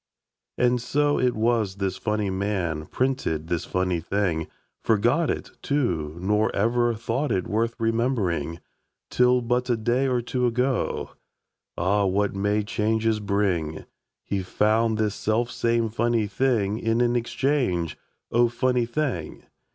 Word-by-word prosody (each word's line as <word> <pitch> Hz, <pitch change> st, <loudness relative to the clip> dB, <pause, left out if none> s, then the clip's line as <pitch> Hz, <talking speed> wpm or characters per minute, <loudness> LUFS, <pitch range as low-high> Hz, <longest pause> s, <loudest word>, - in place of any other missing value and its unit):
And 125 Hz, 0 st, +2 dB
so 145 Hz, +4 st, +1 dB
it 125 Hz, -1 st, +2 dB
was 110 Hz, -3 st, +1 dB
this 100 Hz, -1 st, -2 dB
funny 105 Hz, -2 st, -1 dB
man 95 Hz, -6 st, -2 dB
Printed 125 Hz, -, -1 dB
this 85 Hz, 0 st, -1 dB
funny 90 Hz, -2 st, 0 dB
thing 85 Hz, -2 st, -1 dB, 0.3 s
Forgot 120 Hz, +9 st, +2 dB
it, -, -, -3 dB
too, 85 Hz, -, -1 dB
nor 105 Hz, +4 st, +2 dB
ever 120 Hz, +3 st, +2 dB
thought 120 Hz, +5 st, -2 dB
It 95 Hz, -3 st, 0 dB
worth 115 Hz, +3 st, 0 dB
remembering, 115 Hz, -, 0 dB, 0.5 s
Till 125 Hz, 0 st, +4 dB
but 125 Hz, +2 st, 0 dB
a 120 Hz, -, +2 dB
day 120 Hz, +4 st, +1 dB
or 125 Hz, -2 st, +1 dB
two 125 Hz, +1 st, 0 dB
ago. 125 Hz, +2 st, -1 dB, 0.7 s
(Ah! 100 Hz, +3 st, +2 dB
what 100 Hz, +2 st, +1 dB
may 105 Hz, +2 st, 0 dB
changes 110 Hz, +1 st, 0 dB
bring!) 95 Hz, -6 st, -1 dB, 0.4 s
He 100 Hz, -1 st, -2 dB
found 110 Hz, +4 st, +1 dB
this 105 Hz, -2 st, 0 dB
selfsame 115 Hz, +1 st, 0 dB
funny 115 Hz, 0 st, +1 dB
thing 110 Hz, -1 st, 0 dB
In 115 Hz, +1 st, +1 dB
an 120 Hz, 0 st, +2 dB
exchange 120 Hz, -, 0 dB, 0.4 s
"O, 120 Hz, +1 st, +4 dB
funny 120 Hz, 0 st, +1 dB
thing!" 120 Hz, -, -3 dB
110 Hz, 135 wpm, -25 LUFS, 100-120 Hz, 0.7 s, Till